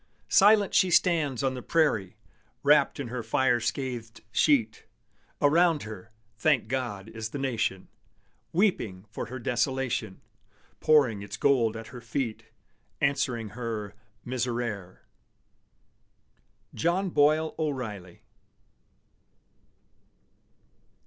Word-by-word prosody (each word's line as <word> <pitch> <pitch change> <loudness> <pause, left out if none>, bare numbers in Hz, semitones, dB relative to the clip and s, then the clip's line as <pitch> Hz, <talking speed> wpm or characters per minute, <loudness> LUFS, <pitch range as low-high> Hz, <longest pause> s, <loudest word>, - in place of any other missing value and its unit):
Silent 205 0 +5
she 185 - +4
stands 160 -7 +2
on 135 -1 +1
the 125 - -6
prairie, 110 - +1 0.5
Wrapped 145 -1 +4
in 135 -4 -4
her 125 0 -4
fire 125 +1 +2
scathed 120 -2 -4
sheet: 115 -5 +2 0.5
Around 160 +1 +3
her, 110 -2 -9 0.3
thank 145 -8 +2
God, 115 -6 -3
is 110 -1 -6
the 145 - -5
Nation, 115 -8 -2 0.6
Weeping 160 - 0
for - - -5
her 130 - -6
desolation, 125 -4 -1 0.6
Pouring 135 -10 +3
its 100 +1 -7
gold 115 -3 +2
at 115 - -9
her 125 - -8
feet, 115 -1 -3 0.5
Answering 130 -6 0
her 110 -2 -5 0.3
"Miserere!" 120 -6 -3 1.7
JOHN 180 +3 0
BOYLE 155 +2 +3
O'REILLY. 115 - -4
125 Hz, 100 wpm, -27 LUFS, 110-145 Hz, 1.7 s, Silent